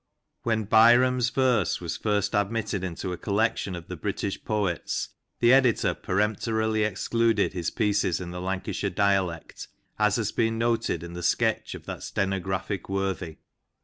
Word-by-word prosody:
When 110 -2 0
Byrom's 120 +3 +5
verse 130 -1 +1
was 85 -2 -4
first 105 -1 0
admitted 100 -1 -1
into 90 +1 -4
a 90 - -7
collection 105 -2 0
of 85 -1 -9
the 90 - -5
British 100 +3 -3
poets, 100 -6 -1 0.3
the 120 +1 +6
editor 130 -4 +4
peremptorily 110 +2 0
excluded 110 +1 +1
his 90 -3 -2
pieces 105 -6 +1
in 90 -1 -6
the 90 0 -6
Lancashire 95 +2 -2
dialect, 95 -3 -1 0.3
as 105 -1 +3
has 110 -4 -1
been 115 0 0
noted 115 -7 0
in 85 0 -8
the 90 - -6
sketch - - 0
of - - -11
that - - -6
stenographic 95 +1 -2
worthy. 95 -4 -2
100 Hz, 145 wpm, -26 LUFS, 95-115 Hz, 0.3 s, the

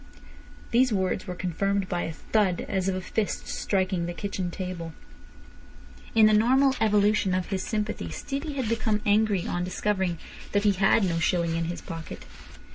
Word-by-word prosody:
These 250 +1 +4
words 190 -1 -1
were 180 - -4
confirmed 195 +2 -1
by 175 -2 -1
a - - -3
thud 190 +2 0
as 190 -1 0
of 190 - -1
a 185 - -3
fist 210 +3 -2
striking 185 -3 -1
the 175 - -5
kitchen 195 -1 -3
table. 175 -3 -5 1.2
In 220 -1 +7
the 215 - +5
normal 260 +5 +4
evolution 210 -3 +3
of 185 -1 -2
his 190 -2 -1
sympathy 215 +1 -3
Stevie 290 +2 -4
had 265 -4 -2
become 220 -2 0
angry 205 -3 +2
on 175 - -2
discovering 185 -1 -1 0.4
that 205 0 +2
he 205 - +5
had 195 +3 +3
no 170 -3 +1
shilling 170 0 +1
in 165 0 -1
his 175 +1 -4
pocket. 165 -1 -8
195 Hz, 170 wpm, -27 LUFS, 180-215 Hz, 1.2 s, In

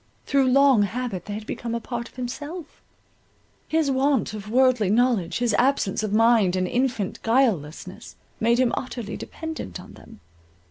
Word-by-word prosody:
Through 275 -2 +2
long 270 -3 +5
habit 205 -2 -3
they 205 - -5
had 215 0 -7
become 235 +1 -4
a - - -1
part 235 0 -5
of - - -27
himself; 290 +6 -7 0.9
his 315 -3 +1
want 265 -3 +1
of 210 -1 -7
worldly 250 -4 +3
knowledge, 220 -6 +2
his 240 -2 0
absence 250 -7 +1
of 215 -2 -3
mind 220 -4 +4
and 185 0 0
infant 245 -3 -1
guilelessness, 195 - -1 0.2
made 235 +2 +3
him 255 -2 +2
utterly 240 -4 -5
dependent 320 - -7
on - - -12
them. - - -15
235 Hz, 155 wpm, -24 LUFS, 210-260 Hz, 0.9 s, long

